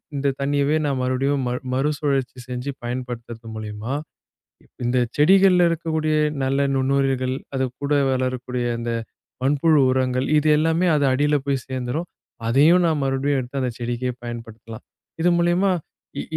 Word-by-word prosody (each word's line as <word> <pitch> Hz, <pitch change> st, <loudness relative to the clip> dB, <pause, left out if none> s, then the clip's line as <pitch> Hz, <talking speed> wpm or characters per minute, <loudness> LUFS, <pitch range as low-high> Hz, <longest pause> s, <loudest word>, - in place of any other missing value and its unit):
இந்தத் 140 Hz, -1 st, -1 dB
தண்ணியவே 140 Hz, +1 st, +1 dB
நான் 140 Hz, -2 st, 0 dB
மறுபடியும் 130 Hz, +2 st, 0 dB, 0.3 s
மறுசுழற்சி 135 Hz, -2 st, 0 dB
செஞ்சு 125 Hz, +2 st, -4 dB
பயன்படுத்துறது 120 Hz, -2 st, -6 dB
மூலியமா, 110 Hz, +3 st, -5 dB, 0.9 s
இந்தச் 120 Hz, -1 st, +1 dB
செடிகள்ல 180 Hz, +3 st, +5 dB
இருக்கக்கூடிய 160 Hz, -1 st, -1 dB, 0.3 s
நல்ல 135 Hz, +1 st, +1 dB
நுண்ணுயிர்கள், 135 Hz, -1 st, +1 dB, 0.2 s
அது 130 Hz, 0 st, +1 dB, 0.2 s
கூட 140 Hz, +1 st, 0 dB, 0.2 s
வளரக்கூடிய 130 Hz, -1 st, -2 dB
அந்த 120 Hz, 0 st, -3 dB, 0.5 s
மண்புழு 145 Hz, +3 st, +3 dB
உரங்கள் 130 Hz, 0 st, 0 dB
இது 155 Hz, +1 st, +1 dB
எல்லாமே 165 Hz, +3 st, +2 dB
அது 145 Hz, -, +1 dB
அடியில 145 Hz, +3 st, +2 dB
போய்ச் 135 Hz, -3 st, -1 dB
சேந்திரும். 130 Hz, +6 st, -3 dB, 0.4 s
அதையும் 155 Hz, +9 st, +5 dB
நான் 155 Hz, -3 st, +1 dB
மறுபடியும் 135 Hz, +1 st, 0 dB
எடுத்து 130 Hz, +2 st, -4 dB
அந்தச் 125 Hz, -2 st, -3 dB
செடிக்கே 120 Hz, +1 st, -2 dB
பயன்படுத்தலாம். 115 Hz, -1 st, -8 dB, 0.4 s
இது 175 Hz, -, +4 dB
மூலியமா 175 Hz, +3 st, +2 dB, 0.5 s
இ -, -, -2 dB
135 Hz, 130 wpm, -22 LUFS, 125-150 Hz, 0.9 s, செடிகள்ல